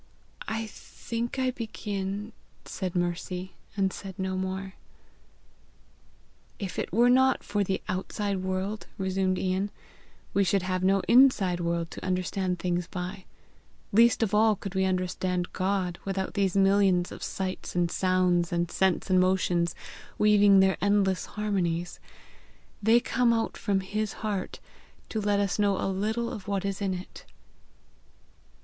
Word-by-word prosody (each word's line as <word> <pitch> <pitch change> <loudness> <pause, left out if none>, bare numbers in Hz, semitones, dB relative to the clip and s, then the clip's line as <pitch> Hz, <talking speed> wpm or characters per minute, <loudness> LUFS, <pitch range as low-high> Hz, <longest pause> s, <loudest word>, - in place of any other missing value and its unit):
"I 225 0 -2
think 230 +2 -6
I 260 -1 +1
begin," 210 -3 -4 0.3
said 185 -2 -4
Mercy 180 +1 -2 0.2
and 190 -2 +1
said 195 -1 -8
no 190 -1 -2
more. 190 +1 -3 1.8
"If 195 -5 -5
it - - -3
were 235 +6 +4
not 260 +1 +4
for 205 0 0
the 190 0 -2
outside 195 +2 -2
world," 190 +3 -3
resumed 190 -1 0
Ian, 190 +2 0 0.6
"we 200 - +3
should 195 0 +1
have 185 0 -1
no 195 +1 +3
inside 235 -9 +5
world 170 -1 -1
to - - -8
understand 185 0 -1
things 175 -1 -1
by. 185 +1 -6 0.7
Least 230 +2 +5
of 210 - -1
all 215 0 +5
could 195 -1 -7
we 190 0 +1
understand 180 -1 -1
God 185 -2 -1
without 195 -1 -3
these 195 -2 +1
millions 195 -2 +3
of - - -9
sights 185 -1 -4
and 175 -1 +1
sounds 180 -2 +2
and 170 0 -1
scents 190 0 +1
and 185 - +5
motions, 180 -2 +2 0.4
weaving 205 -2 +6
their 190 0 +3
endless 200 -2 +2
harmonies. 180 -5 -2 0.8
They 225 +3 +5
come 240 0 +2
out 225 -1 -1
from 195 -1 0
his 210 +2 -3
heart 200 -3 -3 0.5
to 220 - -2
let 205 0 +1
us 200 0 0
know 200 -2 +2
a - - -1
little 215 +5 -1
of 205 -3 -8
what 200 -1 -1
is 195 0 -3
in 190 -2 0
it!" 180 +1 -9
190 Hz, 145 wpm, -28 LUFS, 185-205 Hz, 1.8 s, weaving